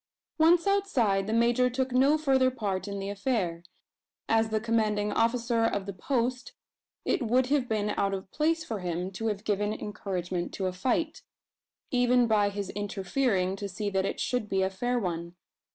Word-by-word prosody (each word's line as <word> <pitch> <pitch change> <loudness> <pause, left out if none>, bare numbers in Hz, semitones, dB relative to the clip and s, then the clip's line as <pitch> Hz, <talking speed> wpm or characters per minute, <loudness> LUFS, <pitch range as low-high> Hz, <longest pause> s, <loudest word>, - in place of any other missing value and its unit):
Once 335 +2 +5
outside, 250 - +2
the - - -2
major 240 +2 +3
took 260 +1 -1
no 270 +5 +4
further 265 -4 +3
part 200 -6 -3
in 200 0 -4
the 195 0 -4
affair. 200 -6 -1 0.7
As 225 0 +2
the 215 0 0
commanding 215 -2 0
officer 230 0 +1
of 205 -3 0
the 200 - -5
post, 250 +5 -2 0.5
it - - +1
would 250 +2 +2
have 275 -4 +2
been 210 -1 0
out 195 -1 0
of 190 0 -8
place 320 +2 +1
for 220 -3 -4
him 180 +1 -3
to 225 +4 -3
have 210 -1 -2
given 205 -1 0
encouragement 185 -4 -4
to 190 - -2
a 185 - -1
fight 245 - -1 0.7
even 245 -1 +4
by 210 -3 +3
his 200 -1 -4
interfering 195 0 -1
to 200 0 -5
see 205 +2 -3
that 190 0 +1
it - - -4
should 245 -4 -1
be 190 -1 +1
a 190 - 0
fair 245 +6 -1
one. 170 -4 -3
215 Hz, 180 wpm, -28 LUFS, 195-250 Hz, 0.7 s, Once